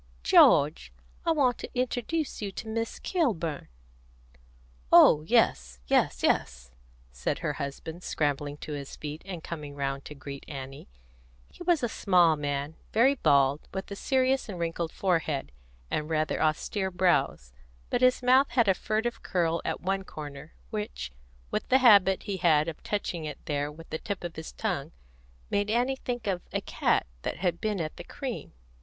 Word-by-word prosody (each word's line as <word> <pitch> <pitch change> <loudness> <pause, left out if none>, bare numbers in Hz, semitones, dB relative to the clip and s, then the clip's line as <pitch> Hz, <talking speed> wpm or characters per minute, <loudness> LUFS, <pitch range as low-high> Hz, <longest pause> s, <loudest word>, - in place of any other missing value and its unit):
"George, 60 0 +5 0.4
I - - +5
want 270 -6 +2
to - - -6
introduce 255 +5 -2
you 200 -2 -3
to 220 - -7
Miss 225 +1 -3
Kilburn." 180 - -1 1.2
"Oh 150 - +8
yes, 60 - +2
yes, - - +2
yes," 60 -1 0 0.4
said 60 0 -2
her 150 - 0
husband, 160 +5 -6
scrambling 145 -3 -1
to 150 - -5
his 140 -1 -6
feet, 150 +1 -6
and 180 -4 -6
coming 150 -4 -6
round 135 -1 -2
to 150 - -8
greet 140 0 -8
Annie. 135 - -8 0.6
He - - -17
was 345 -5 +2
a - - +3
small 180 -7 +4
man, 145 +1 -3
very 245 +5 +5
bald, 140 - +2
with 190 +1 -5
a - - -3
serious 260 +2 +1
and 190 - -5
wrinkled 165 -1 -2
forehead, 160 - -1 0.4
and 150 +1 -1
rather 155 -1 0
austere 190 +5 0
brows; 145 - +1 0.4
but - - +1
his 255 0 +4
mouth 260 +3 +5
had 235 -4 +2
a 190 - +6
furtive 220 +5 -2
curl 170 -3 0
at - - -3
one 195 +2 -1
corner, 150 -3 -9 0.2
which, 210 - -4 0.4
with - - -2
the 260 - +6
habit 200 -7 +6
he 200 -2 -3
had 160 -4 +3
of 165 - -6
touching 180 -6 -3
it 150 -2 -5
there 145 0 -1
with 165 +2 -13
the 160 - -2
tip 200 -4 -5
of 175 -1 -5
his 160 0 -7
tongue, - - -3 0.6
made 205 +1 +1
Annie 245 +4 +1
think 245 -3 -4
of 190 -3 -1
a - - 0
cat - - +1 0.2
that - - -3
had 175 -2 -1
been 210 -3 -1
at 155 -2 -4
the - - -7
cream. - - -6
170 Hz, 170 wpm, -28 LUFS, 145-215 Hz, 1.2 s, Oh